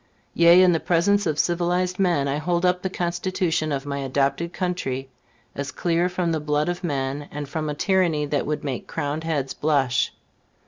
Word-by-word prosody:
Yea, 170 +2 +7
in 180 - +6
the 165 - +2
presence 195 +4 +2
of 155 -2 -1
civilized 180 +2 0
man, 170 -7 +2
I 140 +1 0
hold 170 +3 0
up 180 0 +2
the 190 - -2
Constitution 175 -3 -1
of 140 -1 -2
my 140 -1 -3
adopted 140 +5 0
country 175 -8 -3 0.4
as 140 0 -4
clear 175 +1 0
from 180 -2 -1
the 160 - 0
blood 150 +1 0
of 175 +1 -4
men, 140 -2 -2
and 145 -1 -6
from 155 +1 -3
a 150 - -3
tyranny 175 -4 +1
that 145 -1 -1
would 150 0 -2
make 135 -4 -4
crowned 145 +2 -3
heads 145 -5 -1
blush. 135 -4 +1
160 Hz, 185 wpm, -24 LUFS, 145-180 Hz, 0.4 s, Yea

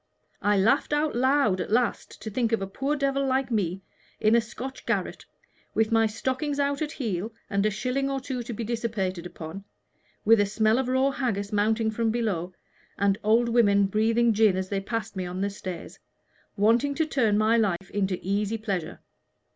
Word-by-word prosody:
I 205 0 +2
laughed 230 +10 +2
out 295 -1 +1
loud 255 -6 +2
at - - -4
last 235 0 0
to 220 - -5
think 230 +2 0
that 225 -3 0
a - - -1
poor 270 +9 -2
devil 275 -1 0
like 265 -1 0
me, 190 -4 -1 0.4
in 215 0 +3
a 235 - +5
Scotch 255 +4 -8
garret, - - -1 0.5
with 220 0 +2
my 225 -1 +4
stockings 260 +6 -2
out 280 0 0
at 310 0 -2
heel 215 -4 -3 0.2
and 200 0 +1
a - - +2
shilling 255 +6 -1
or 275 0 -1
two 255 -1 -4
to 240 - -6
be 230 +1 -4
dissipated 210 -6 -2
upon, 170 +3 -8 0.6
with 225 +1 +6
a 205 - +4
smell 220 +3 +2
of 265 - -1
raw 260 +2 +2
haggis 210 -7 -2
mounting 220 +2 +2
from 225 +1 0
below, 210 -7 -1 0.5
and 200 0 +2
old 225 +3 +3
women 205 -4 +4
breathing 225 +3 +2
gin 210 -3 +4
as 190 0 -3
they 195 -1 -1
passed 225 +1 -4
me 185 -1 -3
on 180 +1 -5
the 200 +1 0
stairs 185 -3 -7 0.6
wanting 235 +8 +3
to 320 - +1
turn 230 -9 +1
my 215 +2 +3
life 195 -5 0
into 195 -2 0
easy 205 +3 -1
pleasure. 195 -6 -4
220 Hz, 190 wpm, -26 LUFS, 200-250 Hz, 0.6 s, with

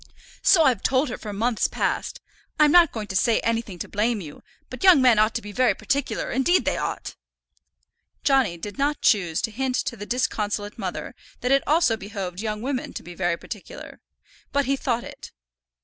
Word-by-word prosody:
"So 350 -5 +5
I've 250 -9 +2
told 265 +2 +1
her 240 - -5
for 210 - -6
months 225 +3 0
past. - - -2 0.4
I'm 300 -1 +6
not 345 -2 +6
going 220 -2 -5
to 190 - -5
say 225 +4 +3
anything 225 -5 -2
to - - -6
blame 215 +2 0
you; 150 -6 -10 0.3
but - - -8
young 370 -6 +8
men 250 -4 +5
ought 215 +1 +3
to - - -2
be 210 - -8
very 255 +3 +2
particular; 280 -2 -2
indeed 265 +9 +2
they - - +1
ought." - - -4 1.1
Johnny 265 -11 +2
did 205 +9 -8
not 290 +1 0
choose 175 -7 +2
to 225 - -1
hint 255 +3 -2
to 240 - -2
the 205 -1 -8
disconsolate 210 -4 -2
mother 190 +4 -5 0.3
that 250 - 0
it 275 0 +5
also 305 -7 +3
behoved 195 -3 -6
young 215 0 -3
women 260 -1 -3
to - - -7
be 175 +1 -10
very 175 -1 -1
particular, 210 +1 -10 0.5
but 280 0 +1
he 275 +2 +1
thought 240 -3 -1
it. - - -10
230 Hz, 195 wpm, -24 LUFS, 205-270 Hz, 1.1 s, young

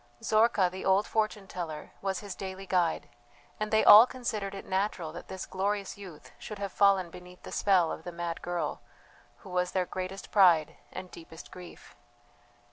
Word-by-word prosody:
Zorka, 215 -3 +3
the 185 - -7
old 195 +2 +3
fortune 215 -2 -1
teller, 160 -5 -6
was 195 +1 -2
his 205 -2 -6
daily 190 0 -7
guide; 180 -3 0 0.5
and 215 0 -2
they 220 0 +3
all 220 +4 +10
considered 215 -6 -4
it 195 - -8
natural 190 -4 -2
that - - -9
this 190 - -6
glorious 200 +1 -2
youth 185 -6 -12
should 210 - -7
have 200 -1 -4
fallen 195 -3 +3
beneath 180 +1 -13
the - - -9
spell 185 -5 +3
of - - -6
the 175 - -6
mad 170 -1 -5
girl, 175 -1 -3 0.6
who - - -12
was 180 0 -1
their 185 -1 +1
greatest 185 +2 -6
pride 175 -7 +5 0.2
and 185 - -8
deepest 165 -1 -12
grief. 180 -1 -12
190 Hz, 175 wpm, -29 LUFS, 180-200 Hz, 0.6 s, all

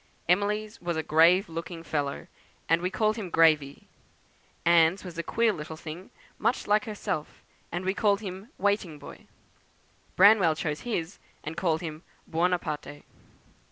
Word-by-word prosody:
Emily's 210 +4 0
was 175 -2 -2
a 160 - -1
grave 170 +6 +5
looking 165 +1 -6
fellow, 145 -4 -3 0.4
and 165 +1 +3
we 180 - 0
called 215 +3 0
him 200 -5 -5
'Gravey.' 155 -4 +3 0.8
Anne's 170 +2 +4
was 180 -2 -8
a - - +2
queer 230 +5 +1
little 155 -2 -7
thing, 165 +4 -9 0.3
much 245 - 0
like 210 +4 +2
herself, 205 -8 -5 0.3
and 175 +2 -4
we 190 - +1
called 205 -1 +2
him 195 +2 -7
'Waiting 200 -5 0
Boy.' 145 - -12 0.9
Branwell 190 -4 +6
chose 155 -2 -3
his, 195 -7 -4 0.2
and 155 +2 -5
called 165 -2 0
him 155 -2 -6 0.2
'Buonaparte.'" 165 -4 -2
175 Hz, 145 wpm, -27 LUFS, 160-200 Hz, 0.9 s, Branwell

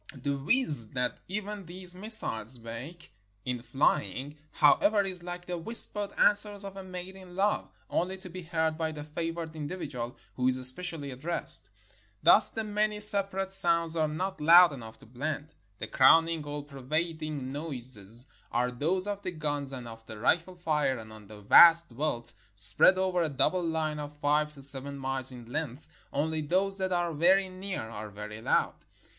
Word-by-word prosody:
The 140 -1 -3
whizz 145 - -1
that 125 -1 -2
even 205 -1 -6
these 180 +1 -7
missiles 180 - 0
make 120 +9 -10 0.3
in 125 -1 -4
flying, 140 +1 -2 0.2
however, 200 +8 +3
is 185 -2 -5
like 175 0 -8
the 180 -1 -5
whispered 210 +1 +3
answers 205 -1 +3
of 195 -1 -9
a 195 - -9
maid 185 0 -9
in 185 -2 -14
love, 200 +2 -1 0.2
only 185 +2 -3
to 190 0 -12
be 185 +1 -9
heard 160 -2 -2
by 160 -1 -2
the 150 -1 -8
favored 165 +1 -6
individual 145 -6 -6 0.2
who 125 0 -1
is 130 0 +3
especially 140 +3 +3
addressed. 155 - +4 0.5
Thus 210 0 +7
the 225 - -5
many 210 0 -2
separate 195 -2 +3
sounds 170 -3 +7
are 160 -1 0
not 180 +4 -5
loud 170 +1 +6
enough 110 -4 -11
to - - -16
blend. 145 +5 -6 0.2
The - - -6
crowning, 165 +4 +3
all 145 0 -6
pervading 150 0 -5
noises 125 -6 -2 0.3
are 125 +1 -1
those 165 +10 -2
of 205 -1 -5
the 185 - -5
guns 145 -4 -4
and 125 -3 -8
of 115 -1 -12
the 110 - -10
rifle 170 - -1
fire, 150 -6 -1
and 110 -1 -11
on 105 -2 -15
the 105 0 -13
vast 165 +10 +6
veldt, 120 -2 -4 0.2
spread 100 - +6
over 185 -1 -1
a 165 - -1
double 165 +6 0
line 160 -2 -3
of 150 0 -9
five 150 +1 0
to 140 - -10
seven 140 +1 +1
miles 135 -1 -1
in 120 -2 -11
length, 145 +2 -6 0.2
only 155 +2 -2
those 195 +6 -1
that 190 0 -2
are 175 -2 -1
very 185 +5 +2
near 185 - -6
are 110 -1 -8
very 105 +1 -10
loud. - - 0
155 Hz, 175 wpm, -28 LUFS, 130-185 Hz, 0.5 s, Thus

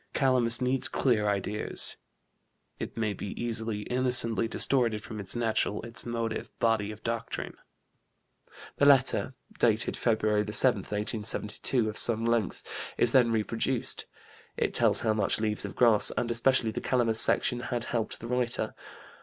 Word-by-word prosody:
Calamus 125 -3 +2
needs 130 +1 +2
clear 110 -7 +1
ideas; 100 +1 -2 0.8
it - - -7
may 110 -2 -1
be 100 +1 -7
easily, 115 -2 -3
innocently 125 -2 +1
distorted 115 -2 +1
from 110 - -8
its 100 +2 -3
natural, 110 -3 -1
its 115 +1 -7
motive, 115 -1 -3
body 110 -2 0
of 105 +1 -12
doctrine." 115 -1 -4 1.2
The 145 - +3
letter, 135 -1 +3 0.2
dated 115 -1 +1
Feb. 115 -2 0 0.3
7, 120 +2 +6
1872, 105 +3 -2
of 105 - 0
some 115 -1 +3
length, 115 -5 -1 0.3
is 120 - +3
then 125 -3 +4
reproduced. 115 +3 -1 0.5
It - - -1
tells - - +3
how 110 - +1
much 105 -1 0
Leaves 105 -1 0
of - - -8
Grass, 115 -4 +4
and 120 - -1
especially 115 -1 +1
the - - -5
Calamus 115 -3 0
section, 120 - +5
had 120 -1 -4
helped 115 -3 -3
the 115 - -8
writer. 125 -1 0
115 Hz, 145 wpm, -28 LUFS, 110-120 Hz, 1.2 s, 7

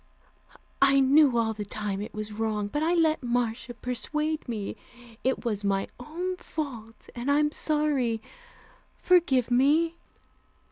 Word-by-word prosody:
I 275 0 +6
knew 270 -1 +5
all 225 -1 +1
the 210 -1 -5
time 205 -1 -4
it 210 - -6
was 215 0 -4
wrong, 210 -1 -2
but 295 - -2
I 335 +3 +2
let 320 -2 +2
Marcia 240 0 -2
persuade 300 +5 -3
me. 215 -4 -4 0.5
It 260 0 0
was 210 -3 -1
my 195 -1 0
own 355 +8 -4
fault, 240 -11 -7
and 245 +3 -4
I'm 295 +1 +3
sorry. 295 -8 +1 0.8
Forgive 285 -10 +3
me." 305 +7 +3
250 Hz, 135 wpm, -27 LUFS, 225-300 Hz, 0.8 s, I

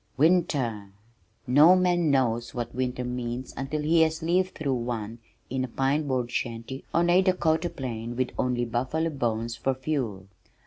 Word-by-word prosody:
Winter! 135 - +1 0.5
No 150 +8 +7
man 175 -3 +2
knows 120 -4 +1
what 120 -1 -4
winter 125 0 -2
means 125 0 -4
until 145 +3 -3
he 165 +2 +4
has 160 0 +1
lived 180 +3 +1
through 140 -3 -1
one 115 -2 -4 0.3
in 130 0 -2
a - - -2
pine 135 +5 0
board 125 -3 -1
shanty 120 +3 -4
on 170 +1 +2
a 175 +2 +5
Dakota 175 -3 +1
plain 120 -4 -5
with 130 0 -1
only 125 -1 0
buffalo 130 +8 -1
bones 115 -4 -2
for 130 +3 -1
fuel. 130 -9 -3
130 Hz, 160 wpm, -27 LUFS, 120-160 Hz, 0.5 s, No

